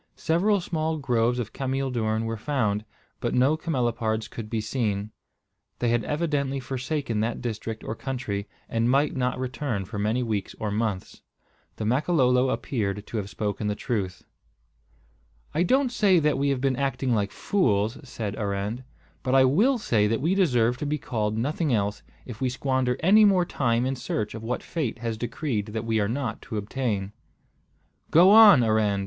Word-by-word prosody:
Several 195 +6 +2
small 160 -2 -2
groves 120 -4 +1
of 115 -3 -4
cameel 135 0 -2
doorn 110 -2 -1
were 115 0 -2
found, 110 -4 -1 0.3
but - - -1
no 130 +5 +4
camelopards 120 -8 -1
could 110 -2 -8
be 115 - -1
seen. 110 -2 -2 0.7
They 120 - 0
had 120 -1 +1
evidently 145 -3 -1
forsaken 130 -2 -3
that 115 +2 -1
district 115 -1 -5
or - - -3
country, 110 -5 -4 0.2
and 115 +1 0
might 140 +3 +2
not 125 -1 0
return 130 -5 -3
for 105 +2 -6
many 110 +5 0
weeks 110 -4 -3
or 105 -2 -2
months. 105 -3 -3 0.5
The 110 - -4
Makololo 130 0 +2
appeared 105 -6 -2
to 115 - -5
have 100 -2 -3
spoken 105 0 -3
the 105 - -1
truth. 100 -5 -3 1.3
"I 160 - +1
don't 260 +8 +2
say 200 -6 +4
that 150 -2 +2
we 140 0 +1
have 135 -2 0
been 135 -2 +1
acting 135 -2 0
like 105 -3 0
fools," 110 - 0
said 110 -6 -5
Arend; 105 +4 -3 0.4
"but 130 0 0
I 130 -1 +6
will 215 - +3
say 110 - +2
that 115 +1 0
we 165 +7 +1
deserve 125 - +2
to 150 - -4
be 150 +1 0
called 110 -6 -2
nothing 150 +5 -1
else, 105 -2 0 0.2
if 120 -2 -9
we 130 - +1
squander 130 -1 0
any 205 +6 +6
more 190 -4 +4
time 120 -6 0
in 135 +1 -1
search 110 -4 -3
of 110 - -7
what 115 +2 -3
fate 145 -9 -3
has 115 -1 -3
decreed 115 -1 -3
that 110 +1 -4
we 110 -1 +1
are 100 0 0
not 120 -2 -3
to 115 -5 -6
obtain." 105 -2 -2 1.0
"Go 175 +5 +7
on, 210 - +9
Arend!" 110 -3 +2
120 Hz, 175 wpm, -26 LUFS, 110-140 Hz, 1.3 s, on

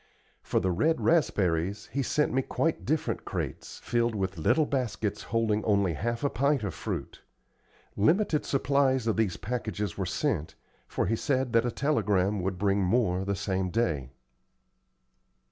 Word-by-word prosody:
For - - 0
the 95 - 0
red 155 - +2
raspberries 100 - +1
he 140 +4 0
sent 150 +2 +1
me 130 - +3
quite 160 +4 -1
different 155 +1 -1
crates, - - -5
filled 120 -1 +1
with 95 -4 -2
little 155 - +3
baskets 110 -8 -2
holding 110 -2 0
only 100 -5 +2
half 115 - -3
a 140 - +2
pint 140 +2 +1
of 100 -5 -2
fruit. - - -5 0.7
Limited 160 - +2
supplies 135 -2 +1
of 110 - +1
these 110 -6 0
packages 105 -5 -3
were - - -1
sent, 75 - -1 0.3
for - - -1
he 115 - +1
said 130 0 -1
that 115 +1 +3
a - - -1
telegram 105 -9 +1
would 95 0 -2
bring 100 +1 +1
more 95 -2 +1
the 100 +1 -1
same 95 -2 -1
day. 85 - -1
110 Hz, 155 wpm, -28 LUFS, 95-130 Hz, 0.7 s, me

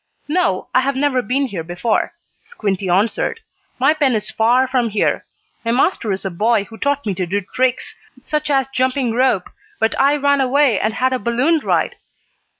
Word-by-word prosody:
"No, 300 - 0
I - - +5
have 275 +1 -1
never 270 -2 +1
been 270 +3 0
here 195 -10 -5
before," 175 +7 -1 0.3
Squinty 200 - -3
answered. 205 - +1 0.4
"My 275 +4 +4
pen 285 -6 +1
is 210 -1 -3
far 245 +4 +3
from 250 -3 0
here. 210 -1 0 0.4
My 230 - -2
master 245 - +1
is 195 +1 -3
a 195 - -2
boy 215 +4 +1
who 225 +2 -13
taught 285 0 0
me 205 - -1
to 185 -1 -3
do 200 +4 -1
tricks, 250 +6 -1 0.3
such 300 0 -2
as 270 -2 +2
jumping 255 -2 0
rope, 245 -7 +1 0.3
but 225 0 +2
I 280 +2 +4
ran 285 -1 +2
away 265 -4 +3
and 215 +3 -1
had 260 +1 +1
a 255 - -1
balloon 250 +9 +1
ride." - - 0
250 Hz, 185 wpm, -19 LUFS, 210-275 Hz, 0.4 s, I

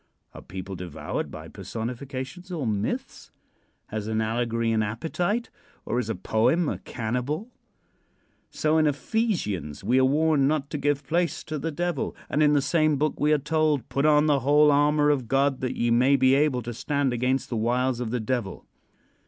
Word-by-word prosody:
Are - - -10
people 95 +1 -7
devoured 90 -3 -5
by - - -9
personifications 130 +9 -6
or 160 -7 -3
myths? 105 -1 -3 0.6
Has 105 0 -4
an 110 0 -1
allegory 115 +1 0
an 110 -1 +2
appetite, 170 - -2 0.3
or 120 - -1
is 115 -3 -3
a 110 - -1
poem 125 +10 +1
a - - -2
cannibal? 125 - -3 1.0
So 155 +1 +1
in 155 - +3
Ephesians 140 - -2
we 125 +6 +3
are - - +4
warned 145 +1 +3
not 150 -1 -1
to 150 - -3
give 145 0 0
place 170 +1 -1
to 155 -1 -4
the 165 - -2
Devil, 170 -2 -2 0.2
and 150 - +1
in 150 -1 +5
the 145 -2 +3
same 155 0 +2
book 150 +2 -1
we 150 +1 +2
are 150 - +5
told: 150 -1 0
"Put 140 +2 +1
on 150 0 +5
the 145 -2 +3
whole 145 +3 +5
armor 145 +1 +3
of 130 -5 -1
God, 135 +1 +1
that 130 - -2
ye 120 0 0
may 130 +4 +4
be 130 -1 +4
able 135 -3 +2
to 120 +1 -5
stand 140 +2 -1
against 125 +2 0
the 120 - -3
wiles 120 +3 0
of 120 -2 -3
the 125 +2 -1
Devil." 110 -3 -3
135 Hz, 185 wpm, -26 LUFS, 120-150 Hz, 1.0 s, in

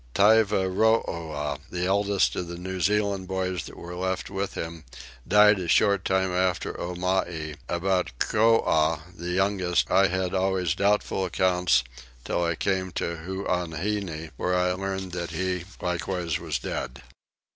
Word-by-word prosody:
Tyvarooah, 95 -7 +2
the 90 0 -2
eldest 100 +1 +2
of 90 - -3
the 85 0 -6
New 95 +1 -5
Zealand 100 -2 +1
boys 95 -3 -2
that - - -11
were 85 +1 -8
left 95 +1 -3
with 100 0 -3
him, 80 -1 -5 0.4
died 105 +1 +6
a 90 - -4
short 100 +2 +3
time 95 0 +1
after 90 0 0
Omai: 85 -3 -2
about 90 -2 0
Coah, 80 - +2
the 85 0 -6
youngest, 95 -1 +1
I 95 - +5
had 95 0 -1
always 95 -3 +1
doubtful 100 0 +1
accounts 90 -6 +2 0.4
till 85 - 0
I 85 -1 0
came 95 +1 -1
to 85 0 -2
Huaheine, 90 -1 -3
where 90 - 0
I 90 0 +2
learnt 95 0 -4
that 85 -1 -3
he 90 -1 -2
likewise 90 -1 -2
was 80 -4 -2
dead. 65 +2 -5
90 Hz, 140 wpm, -26 LUFS, 85-95 Hz, 0.4 s, died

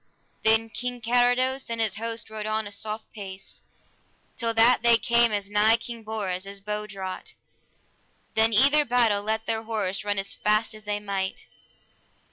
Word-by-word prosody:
Then 225 0 +3
King 245 +1 -4
Carados 245 +3 +2
and 230 0 -3
his 220 -3 +1
host 230 0 -4
rode 215 -1 -5
on 215 0 -1
a 205 - -7
soft 215 +1 -6
pace, 195 -2 -8 0.7
till 230 -2 -1
that 230 +2 +5
they 235 0 +6
came 235 -1 +3
as 205 -1 -3
nigh 215 +2 +4
King 235 0 -7
Bors 200 -4 -3
as 200 0 -5
bow 210 +1 -4
draught; 190 -2 -7 1.0
then 225 +1 +3
either 280 +7 +5
battle 235 -6 +2
let 220 +1 -2
their 225 -1 -1
horse 215 -4 -2
run 205 -1 -1
as 195 0 -2
fast 215 +2 +1
as 215 0 -13
they 205 0 -2
might. 195 -2 -4
220 Hz, 165 wpm, -26 LUFS, 205-230 Hz, 1.0 s, they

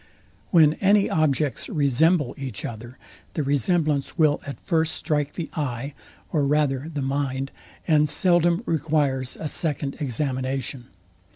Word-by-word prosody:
When 155 -4 +6
any 200 +1 +4
objects 150 -3 0
resemble 150 +1 +2
each 130 -7 -6
other, 120 +2 -8 0.4
the 155 - 0
resemblance 145 +2 +1
will 155 -3 +3
at 140 - -6
first 160 -3 +1
strike 150 -2 -1
the 165 -3 -4
eye, 140 -2 -3 0.4
or 150 -3 +1
rather 145 0 +1
the 145 -3 -3
mind; 135 0 -2 0.4
and 150 -2 +4
seldom 175 +3 +2
requires 145 - 0
a 160 - -3
second 145 -2 -2
examination. 130 -1 -3
145 Hz, 125 wpm, -24 LUFS, 135-160 Hz, 0.4 s, When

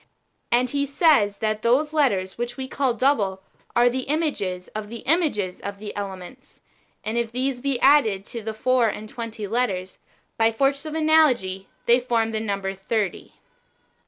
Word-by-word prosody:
And 245 +1 +2
he 280 0 0
says 280 - +3
that 215 -1 -1
those 275 +7 +2
letters 200 -12 +1
which 240 +2 -4
we 265 -1 -4
call 260 -3 0
double^ 215 -7 +2 0.4
are 240 +1 +5
the 255 +2 -1
images 205 - -1
of 215 -1 -6
the 235 0 -8
images 275 - +1
of 200 0 -5
these 205 0 -7
elements; 200 +5 -8 0.4
and 225 +2 -1
if 235 -1 -2
these 255 +1 -2
be 275 -2 -1
added 225 -9 +4
to 230 - -6
the 220 0 -5
four 255 +1 +2
and 215 0 -4
twenty 230 -2 -6
letters, 195 -4 -2 0.4
by 225 0 +5
the 225 - -9
force 275 +3 +1
of 310 - -5
analogy 280 -12 +3 0.2
they 240 +1 +5
form 230 -2 0
the 220 - -1
number 200 -3 -2
thirty. 195 +1 -3
230 Hz, 170 wpm, -24 LUFS, 205-270 Hz, 0.4 s, are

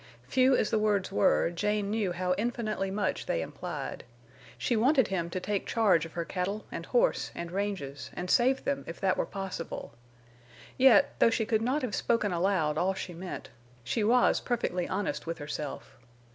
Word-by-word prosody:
Few 255 - +3
as - - 0
the 220 - +2
words 205 -3 +1
were, 195 -3 +3
Jane 205 +3 -1
knew 210 -4 0
how 180 +1 0
infinitely 215 -2 -2
much 200 +1 -2
they 85 - 0
implied. - - -6 0.5
She 240 - 0
wanted 260 +1 +3
him 170 -3 -1
to 185 - -3
take 200 +1 -2
charge 190 -8 +3
of 160 - -18
her 170 -1 -3
cattle 195 +5 -3
and - - -6
horse - - +2
and 170 0 -5
ranges, 190 -8 -3
and 180 - -4
save 255 +7 +3
them 280 0 -1
if 165 - -7
that 190 -2 +2
were - - -1
possible. 190 - -6 0.8
Yet, 255 -5 +6
though - - +6
she 225 -1 0
could 220 0 +1
not 260 +5 0
have 240 -5 -2
spoken 215 -3 +1
aloud 170 -4 +1
all 190 +2 +1
she 185 -1 -5
meant, 170 -6 -7 0.3
she 210 - -1
was 240 +3 +4
perfectly 185 -7 -1
honest 200 -4 -2
with 165 0 -3
herself. 145 -2 -6
200 Hz, 180 wpm, -29 LUFS, 175-225 Hz, 0.8 s, Yet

